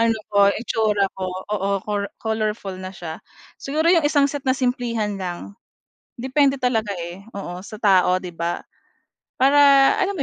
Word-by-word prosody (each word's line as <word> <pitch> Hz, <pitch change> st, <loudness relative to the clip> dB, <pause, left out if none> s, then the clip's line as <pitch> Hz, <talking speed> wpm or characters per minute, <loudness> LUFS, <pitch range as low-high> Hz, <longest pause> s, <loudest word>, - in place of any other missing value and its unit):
ano 230 Hz, -1 st, +2 dB
ko, 200 Hz, -1 st, +5 dB
itsura 215 Hz, -3 st, 0 dB
ko, 190 Hz, -1 st, -3 dB, 0.2 s
oo, 200 Hz, -1 st, -1 dB
cor 205 Hz, -1 st, -2 dB
colorful 215 Hz, -3 st, -2 dB
na 185 Hz, 0 st, -7 dB
siya. 160 Hz, -2 st, -7 dB, 0.4 s
Siguro 310 Hz, +4 st, 0 dB
'yong 335 Hz, -4 st, +3 dB
isang 290 Hz, -2 st, +3 dB
set 285 Hz, -1 st, -5 dB
na 260 Hz, -, +3 dB
simplehan 235 Hz, -5 st, -1 dB
lang. 175 Hz, -, -6 dB, 0.7 s
Depende 275 Hz, +2 st, +2 dB
talaga, 225 Hz, -5 st, 0 dB
eh, 175 Hz, +3 st, -7 dB
oo, 180 Hz, -3 st, -6 dB
sa 215 Hz, +1 st, -10 dB
tao 185 Hz, -3 st, +4 dB
‘di 180 Hz, -1 st, -8 dB
ba? 170 Hz, +1 st, -2 dB, 0.8 s
Para 275 Hz, +2 st, +5 dB, 0.4 s
alam 400 Hz, +1 st, 0 dB
mo 295 Hz, -, -1 dB
215 Hz, 160 wpm, -22 LUFS, 190-255 Hz, 0.8 s, ko